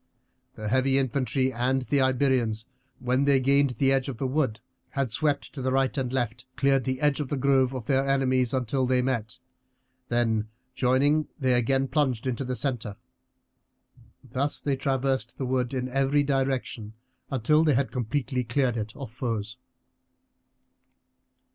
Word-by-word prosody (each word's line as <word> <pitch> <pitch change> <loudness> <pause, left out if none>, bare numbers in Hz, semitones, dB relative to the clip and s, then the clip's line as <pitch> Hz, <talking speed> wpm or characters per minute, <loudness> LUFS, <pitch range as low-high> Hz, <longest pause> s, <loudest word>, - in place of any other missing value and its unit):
The 110 - -5
heavy 130 +4 +2
infantry 130 0 0
and 130 +2 0
the 140 +2 +1
Iberians, 130 -4 +1 0.3
when 130 +2 0
they 140 -1 +4
gained 140 +2 +3
the 135 +1 +3
edge 135 0 +1
of 130 - -5
the 135 - -2
wood, 130 -4 0 0.3
had 135 -5 -2
swept 145 +4 -1
to 135 - -6
the 130 0 0
right 135 0 +1
and 130 -3 -2
left, 120 -1 -2
cleared 135 -1 +2
the 130 0 -1
edge 145 -1 +2
of 145 - -2
the 145 - -1
grove 135 -1 +3
of 125 -4 -5
their 135 +1 +1
enemies 130 -3 +2
until 130 0 0
they 125 0 +2
met, 120 -2 -2 0.7
then 115 -3 +1 0.3
joining 140 +5 +2
they 130 -3 +1
again 135 +3 +2
plunged 130 -4 0
into 130 +1 -2
the 130 0 -3
centre. 120 -7 -3 1.3
Thus 130 +3 -1
they 140 -2 -1
traversed 135 0 -1
the 135 - -3
wood 125 -1 0
in 130 -2 -2
every 135 +2 +2
direction 130 -5 -2 0.4
until 140 +5 +3
they 150 -4 +3
had 135 +1 0
completely 125 0 -2
cleared 120 0 0
it 105 +1 -4
of 135 -6 -8
foes. 115 -1 -4
130 Hz, 160 wpm, -26 LUFS, 125-135 Hz, 1.3 s, they